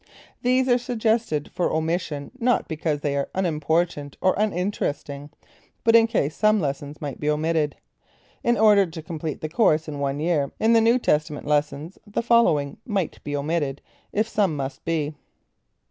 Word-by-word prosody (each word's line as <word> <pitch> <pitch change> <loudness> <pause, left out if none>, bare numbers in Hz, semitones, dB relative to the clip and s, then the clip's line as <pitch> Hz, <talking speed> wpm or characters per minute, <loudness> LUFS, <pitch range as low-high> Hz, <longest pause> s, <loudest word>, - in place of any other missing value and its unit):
These 255 +1 +2
are 245 -1 +4
suggested 225 - -1
for 180 - 0
omission 160 -3 -2
not 245 +1 +2
because 155 -2 -2
they 145 -1 -1
are 140 - -1
unimportant 160 -4 0
or 185 - +3
uninteresting, 175 -8 -2 0.5
but 230 0 +5
in 230 0 +7
case 160 - 0
some 215 0 +3
lessons 145 -1 -4
must 145 -3 -5
be 150 - -1
omitted. 155 0 0 0.7
In 240 0 +2
order 205 -3 +5
to 160 -1 -8
complete 160 -2 -5
the 155 - -2
course 155 -2 +2
in 145 -2 -5
one 140 0 -1
year 155 -3 0
in 225 +1 +4
the 230 - +6
New 230 +2 +4
Testament 150 - 0
lessons, 150 +3 -1
the 205 +3 -2
following 195 -13 +3
might 195 -7 -3
be 145 - -3
omitted, 145 -1 -1 0.3
if 215 +2 0
some 200 -7 +1
must 135 -1 -5
be. 155 -2 -1
160 Hz, 160 wpm, -24 LUFS, 145-215 Hz, 0.7 s, in